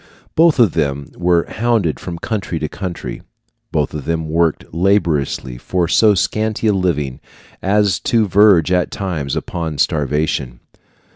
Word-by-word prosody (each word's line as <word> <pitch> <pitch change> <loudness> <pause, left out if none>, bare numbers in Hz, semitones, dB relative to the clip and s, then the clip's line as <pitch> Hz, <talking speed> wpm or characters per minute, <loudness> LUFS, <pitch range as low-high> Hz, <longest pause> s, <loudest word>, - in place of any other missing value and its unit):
Both 165 -2 +4
of 115 - +4
them 70 0 -2
were 85 -1 +2
hounded 110 -8 0
from 85 -2 -6
country 100 -2 -3
to 80 - -2
country; 90 +1 -6 0.5
both 75 -3 -1
of 75 -3 -5
them 80 -1 -2
worked 80 0 +1
laboriously 80 -9 0
for 90 +3 -1
so 105 +4 +4
scanty 110 +5 -1
a 105 - +4
living 75 -9 -1 0.4
as 100 -2 +2
to 115 -3 +2
verge, 95 -3 +5
at 90 -1 +2
times, 80 -9 -3
upon 80 -4 -4
starvation. 70 -5 -1
85 Hz, 140 wpm, -18 LUFS, 75-100 Hz, 0.5 s, verge